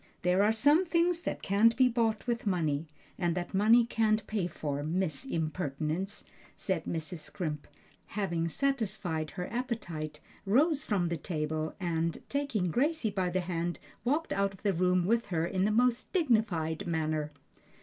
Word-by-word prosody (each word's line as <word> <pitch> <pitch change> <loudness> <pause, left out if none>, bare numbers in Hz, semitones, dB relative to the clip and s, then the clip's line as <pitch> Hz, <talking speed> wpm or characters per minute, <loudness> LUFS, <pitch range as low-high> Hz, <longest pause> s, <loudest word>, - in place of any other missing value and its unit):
"There 180 +2 +3
are 210 +2 +4
some 290 +10 +4
things 345 0 +2
that - - -4
can't 220 +4 +4
be 255 -1 +6
bought 230 -3 0
with 235 -2 -2
money, 160 -5 0 0.3
and 175 -2 +1
that 175 +1 -4
money 220 +5 +5
can't 220 -2 +1
pay 205 -5 -1
for, 145 -4 -3
Miss 165 - -1
Impertinence;" 160 - -2 0.4
and 185 -5 +1
Mrs. 165 +1 -4
Scrimp, 150 -1 -5 0.4
having 170 -5 -1
satisfied 195 - -1
her 180 - -2
appetite, 175 - -3 0.2
rose 275 - +3
from 185 -5 +1
the 170 - -1
table 155 -1 -3
and, 165 -2 -1
taking 235 -11 0
Gracie 280 - +1
by 190 -2 0
the 185 +1 0
hand, 175 -1 -2 0.3
walked 300 +7 0
out 195 0 0
of - - -21
the 200 -2 +2
room 180 0 +2
with 230 +4 +2
her 165 -3 0
in 185 +2 0
the 215 - +2
most 245 +2 +2
dignified 215 - +1
manner. 155 -2 -1
190 Hz, 160 wpm, -31 LUFS, 165-230 Hz, 0.4 s, be